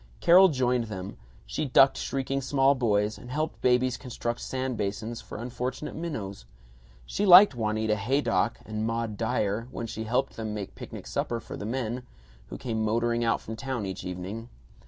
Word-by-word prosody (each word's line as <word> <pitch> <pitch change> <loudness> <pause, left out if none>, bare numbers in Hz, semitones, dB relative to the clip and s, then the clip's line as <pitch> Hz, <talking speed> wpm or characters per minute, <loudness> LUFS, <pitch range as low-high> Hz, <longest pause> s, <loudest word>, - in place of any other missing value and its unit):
Carol 185 +3 +7
joined 125 -4 +1
them; 95 -2 -6 0.3
she - - -2
ducked 135 0 +6
shrieking 135 0 -2
small 135 +1 +3
boys, 105 -5 +1
and 125 - -11
helped 155 +4 -3
babies 125 0 +3
construct 120 -2 -4
sand 130 -1 -2
basins 110 +3 -3
for - - -9
unfortunate 125 +4 -4
minnows. 105 - -5 0.6
She 200 - -2
liked 190 -2 +9
Juanita 110 -2 0
Haydock 120 +1 +1
and 110 0 -3
Maud 115 -1 -2
Dyer 110 0 -1
when 115 - -5
she 110 0 -5
helped 125 +4 0
them 110 -1 -4
make 100 -2 -5
picnic - - -9
supper 90 - -2
for - - -8
the 105 - -5
men, 120 0 -2 0.5
who - - -7
came 110 -3 -2
motoring 115 +2 +1
out 115 - +1
from 110 - -6
town 130 -3 -3
each 95 -1 -5
evening. 95 +6 -6
115 Hz, 170 wpm, -28 LUFS, 110-130 Hz, 0.6 s, liked